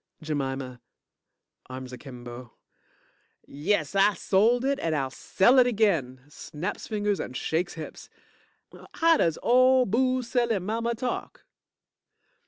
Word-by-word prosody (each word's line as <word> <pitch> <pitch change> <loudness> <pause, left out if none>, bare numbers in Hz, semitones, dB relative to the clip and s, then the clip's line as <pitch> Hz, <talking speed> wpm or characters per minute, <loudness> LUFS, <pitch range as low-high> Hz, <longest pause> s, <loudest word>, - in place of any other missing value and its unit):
JEMIMA 135 -4 -4 0.9
(Arms 130 0 -8
akimbo) 125 -2 -10 0.9
Yes, 155 +3 -1
I 195 +1 +4
sold 230 +6 +2
it 275 0 0
and 165 -1 -1
I'll 135 -3 -2
sell 240 - +3
it 250 - +5
again. 170 - 0
(snaps 155 +5 -6
fingers 205 -3 -1
and 125 - -5
shakes 175 +2 -2
hips) 160 -2 -9 0.9
How 330 -1 +4
does 165 -2 +1
ole 255 +1 +5
booze 255 +3 0
selling 235 -7 0
mama 230 +3 -1
talk? 245 +2 -5
195 Hz, 115 wpm, -26 LUFS, -, 0.9 s, it